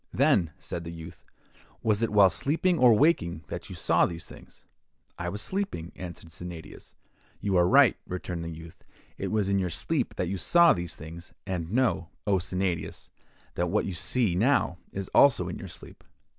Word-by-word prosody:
'Then,' 85 - +3
said 85 -2 -6
the 85 - -7
youth, 85 +1 -10 0.6
'was 110 -1 +2
it 115 - +1
while 100 -3 +6
sleeping 165 - +1
or 125 -2 +7
waking 105 - +2
that - - -6
you - - -7
saw - - +2
these 85 -1 -2
things?'—'I 85 +1 -11
was 105 +3 -5
sleeping,' 185 - -3
answered 85 -2 -9
Sennadius. 85 -2 -10 0.4
'You 100 -2 -1
are 90 -1 +5
right,' - - +6
returned 90 -2 -4
the 85 - -5
youth, 80 0 -11 0.4
'it - - -2
was 105 -3 0
in 100 0 +2
your 90 -2 -1
sleep - - -2
that 90 - -1
you 95 +1 -3
saw 170 - +5
these 85 -2 -4
things; 80 +3 -10
and 90 -3 -4
know, 115 -8 +1 0.2
O 100 -2 +2
Sennadius, 90 -1 -3 0.4
that - - -1
what - - +1
you 95 - -3
see 110 +2 +1
now 100 -2 +2
is 95 -1 -5
also 120 -11 +5
in 90 - -5
your - - -7
sleep. - - -13
90 Hz, 180 wpm, -27 LUFS, 85-105 Hz, 0.6 s, or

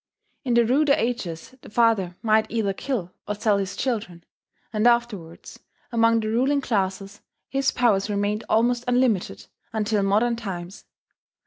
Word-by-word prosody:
In 245 -4 0
the 235 -1 +5
ruder 280 +4 +3
ages 230 -7 -3
the - - -13
father 215 -6 +2
might 220 0 +3
either 215 -4 -1
kill 195 -6 -4
or 210 - -2
sell 210 -1 +1
his 195 0 -4
children; 205 -10 -3 0.5
and 215 +2 +2
afterwards, 230 -9 -1 0.3
among 230 -1 +3
the 215 - -3
ruling 260 +6 +2
classes 195 -4 -2 0.3
his 270 0 +1
powers 215 -5 +1
remained 205 +1 -1
almost 235 +2 +2
unlimited 220 - +1 0.3
until 215 -1 0
modern 215 +5 +2
times. 190 -5 -7
220 Hz, 140 wpm, -24 LUFS, 195-240 Hz, 0.5 s, the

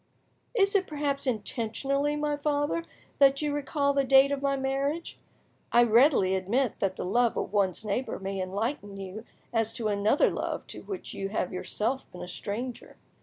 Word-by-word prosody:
"Is 395 -3 +3
it 385 -2 +2
perhaps 285 -2 -2
intentionally, 255 +6 -1
my 295 0 0
father, 290 +2 0 0.4
that 275 0 +6
you 295 -1 0
recall 285 0 0
the 275 0 +2
date 270 +1 +6
of 280 -1 -1
my 275 -1 +1
marriage? 275 +5 -2 0.5
I 240 - +6
readily 235 -4 +5
admit 210 +7 0
that 190 -1 0
the - - -4
love 235 +5 +2
of 205 - -3
one's 200 0 +1
neighbour 215 +6 -2
may 195 0 -4
enlighten 200 +2 -3
you 195 +3 -7 0.3
as 225 -1 +1
to 225 -3 -2
another 205 +6 +3
love - - -3
to - - -6
which 385 -3 -6
you 195 0 -3
have 190 -3 -2
yourself 225 +7 -2
been 180 - -8
a - - -7
stranger. 225 +7 -5
255 Hz, 170 wpm, -28 LUFS, 205-280 Hz, 0.5 s, that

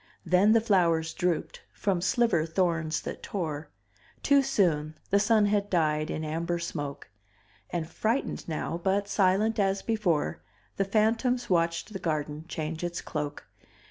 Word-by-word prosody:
Then 180 +5 +5
the 230 - +5
flowers 170 -7 +2
drooped, 180 -2 -1
from 190 -4 -1
sliver 190 -4 +2
thorns 165 -2 0
that - - -6
tore; 160 -6 -4 0.5
Too 280 -1 +5
soon 160 - +1
the 200 - +5
sun 210 0 +4
had 205 0 +1
died 155 -3 +1
in 155 - -3
amber 165 +3 -2
smoke, 145 - -5 0.6
And 165 -2 -3
frightened 220 +5 -2
now 165 +2 -3
but 200 +1 +1
silent 205 +3 +2
as 195 -1 +1
before 175 - 0 0.4
The 195 - +1
phantoms 230 +4 +1
watched 170 +4 +1
the 195 - -4
garden 155 -2 -3
change 160 0 -4
its 175 0 -2
cloak. 150 -2 -5
175 Hz, 140 wpm, -28 LUFS, 160-205 Hz, 0.6 s, Then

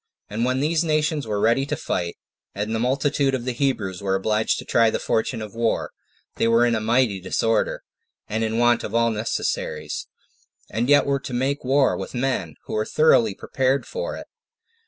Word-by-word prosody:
And 115 +3 0
when 130 +1 0
these 160 +3 +2
nations 155 -3 0
were 105 -1 -1
ready 115 +5 +3
to - - -1
fight, 85 -1 -3 0.4
and 105 +2 -2
the 115 - 0
multitude 135 +2 +1
of 120 -2 -5
the 130 - 0
Hebrews 115 -8 -1
were 95 -1 0
obliged 105 +3 +1
to - - -7
try 115 -1 +4
the - - -1
fortune 110 0 -1
of 105 - -9
war, 115 0 -1 0.5
they - - +2
were 115 +1 +4
in 120 - +2
a 110 - +1
mighty 115 -2 +2
disorder, 110 +4 0 0.4
and 110 +2 -1
in 110 0 -1
want 120 0 +3
of 105 - -4
all 115 0 +3
necessaries, 105 -7 -3 0.6
and 115 +5 -1
yet 145 0 +6
were 140 0 +1
to 130 -1 -7
make 135 +3 -1
war 135 +1 +3
with - - -6
men 120 - -1
who - - -7
were 110 - +1
thoroughly 115 -6 +3
well - - -24
prepared 135 0 0
for - - -4
it. - - -8
115 Hz, 200 wpm, -23 LUFS, 110-135 Hz, 0.6 s, yet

